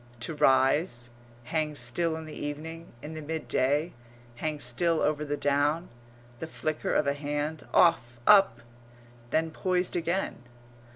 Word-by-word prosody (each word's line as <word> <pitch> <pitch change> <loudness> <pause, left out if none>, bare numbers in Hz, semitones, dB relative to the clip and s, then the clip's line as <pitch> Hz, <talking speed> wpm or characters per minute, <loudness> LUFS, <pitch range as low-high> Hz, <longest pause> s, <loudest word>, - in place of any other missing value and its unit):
To 140 - -3
rise; 135 -3 +2 0.3
hang 155 +3 -1
still 160 +6 -1
in 160 0 -6
the 155 - -9
evening, 160 +3 -6
in 155 - -6
the 155 - -6
midday; 150 0 0 0.4
hang 155 +2 -2
still 155 +7 +1
over 150 0 +1
the 145 0 -2
down. 145 +4 +1 0.5
The 160 - -5
flicker 155 -1 -2
of - - +3
a 140 - +2
hand 145 +2 -3
off, 120 -8 +3
up! 195 - +6 0.7
then 160 +3 +1
poised 180 +2 0
again. 175 +3 -1
150 Hz, 135 wpm, -28 LUFS, 145-165 Hz, 0.7 s, up